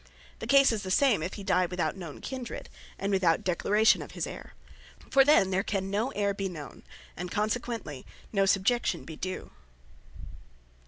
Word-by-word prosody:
The - - -6
case 275 -1 +6
is 220 -2 -2
the 190 - -6
same, 225 - +3
if 170 +4 -4
he 200 - -7
dye 185 -2 +2
without 180 +1 -2
known 170 -6 -8
Kindred, 260 -3 -6 0.3
and 200 +1 -2
without 180 -4 +2
declaration 210 +5 +3
of - - -9
his - - -2
Heyre. - - -9 0.6
For 275 - +7
then 265 -10 +4
there 190 +1 +2
can 195 -2 -2
no 215 +6 0
Heire 200 -1 +1
be 195 -1 -2
known, 155 -5 -9 0.3
and 180 +1 -5
consequently 215 - -3 0.3
no 195 -1 +3
Subjection 195 -1 +1
be 160 - -8
due. 185 +3 -5
195 Hz, 170 wpm, -29 LUFS, 180-220 Hz, 0.6 s, For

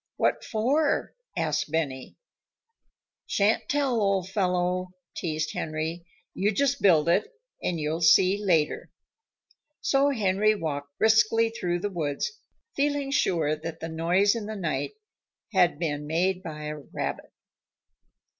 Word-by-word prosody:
"What - - +1
for?" 275 +8 +1 0.2
asked 155 -1 0
Benny. 140 -5 -2 1.1
"Shan't 205 +2 +1
tell, 270 -5 +1
old 195 -2 0
fellow," 180 -1 0 0.2
teased 155 -2 -2
Henry. 160 +2 -4 0.3
"You 200 +3 +1
just 280 +4 +1
build 165 -5 +5
it, 175 - +2 0.3
and 170 -2 -1
you'll 155 +2 -2
see 185 +5 +5
later." 165 -6 +1 0.9
So 275 +1 +2
Henry 215 -3 +2
walked 145 -5 -5
briskly 220 +1 +4
through 175 -6 -2
the 205 +1 -2
woods, 155 - -2 0.4
feeling 285 -1 0
sure 160 - +1
that 160 +1 -7
the 165 - -5
noise 175 +5 +2
in 225 -3 -4
the 215 - -5
night 155 -8 -2 0.6
had 180 -5 +4
been 150 -3 -3
made 180 +4 +1
by 155 -4 -7
a 150 0 -5
rabbit. 140 - -5
180 Hz, 125 wpm, -27 LUFS, 160-215 Hz, 1.1 s, build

